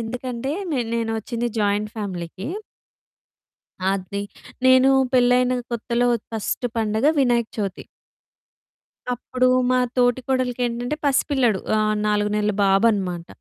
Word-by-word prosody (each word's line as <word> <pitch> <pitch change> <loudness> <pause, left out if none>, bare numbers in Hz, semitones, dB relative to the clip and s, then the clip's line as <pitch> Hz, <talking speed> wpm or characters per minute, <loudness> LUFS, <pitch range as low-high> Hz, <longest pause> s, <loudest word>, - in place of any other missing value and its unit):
ఎందుకంటే 245 +2 -4 0.2
నే 265 - +1
నేనొచ్చింది 230 +1 -2
జాయింట్ 210 0 0
ఫ్యామిలీకి. 190 0 -5 1.4
అది. 195 +1 -3 0.4
నేను 260 +1 +6 0.2
పెళ్ళైన 250 0 +4 0.2
కొత్తలో 235 +1 0 0.2
ఫస్ట్ 225 +3 -2
పండుగ 220 +3 +1
వినాయక 240 -3 +2
చవితి. 195 -3 -3 1.3
అప్పుడు 255 +1 -1 0.2
మా 255 - +3 0.2
తోటి 245 0 +3
కోడలికేంటంటే 245 0 -1
పసి 280 -1 +3
పిల్లాడు. 245 -9 +2 0.2
ఆహ్, 215 0 +1
4 210 0 +1
నెలల 210 0 +1
బాబనమాట. 195 -4 +2
230 Hz, 105 wpm, -22 LUFS, 210-250 Hz, 1.4 s, నేను